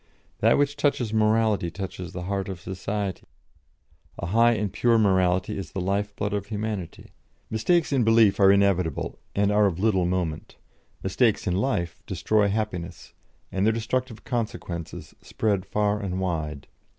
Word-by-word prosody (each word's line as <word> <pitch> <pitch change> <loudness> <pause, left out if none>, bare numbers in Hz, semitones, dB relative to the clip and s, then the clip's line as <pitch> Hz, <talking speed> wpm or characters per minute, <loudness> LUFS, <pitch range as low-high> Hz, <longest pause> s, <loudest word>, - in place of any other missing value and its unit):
That - - +4
which 145 0 +1
touches 135 -6 0
morality 110 -4 +2
touches 90 0 -6
the 90 - -6
heart 100 +1 -2
of 95 -3 -5
society; 95 +1 -4 1.0
a - - -4
high 115 +6 +4
and 105 -3 -2
pure 120 -1 +3
morality 95 -3 +2
is 95 -4 -6
the - - -3
life 100 +2 -1
blood 105 -2 -2
of 100 -1 -2
humanity; 105 -5 -5 0.4
mistakes 150 +9 +2
in 130 -3 +3
belief 115 -2 +4
are 95 -1 +7
inevitable, 95 -5 +1 0.2
and 100 0 +2
are 105 0 +4
of 90 -4 -2
little 95 -3 +2
moment; 90 -4 -3 0.5
mistakes 105 +4 +1
in 90 - 0
life 95 -6 -1
destroy 100 +3 +1
happiness, 100 -5 -4 0.4
and 95 - -1
their 110 +2 +3
destructive 115 0 -3
consequences 100 -8 -4
spread 100 -4 -1
far 105 0 0
and 95 -3 -3
wide. 80 -6 -3
100 Hz, 150 wpm, -25 LUFS, 90-110 Hz, 1.0 s, are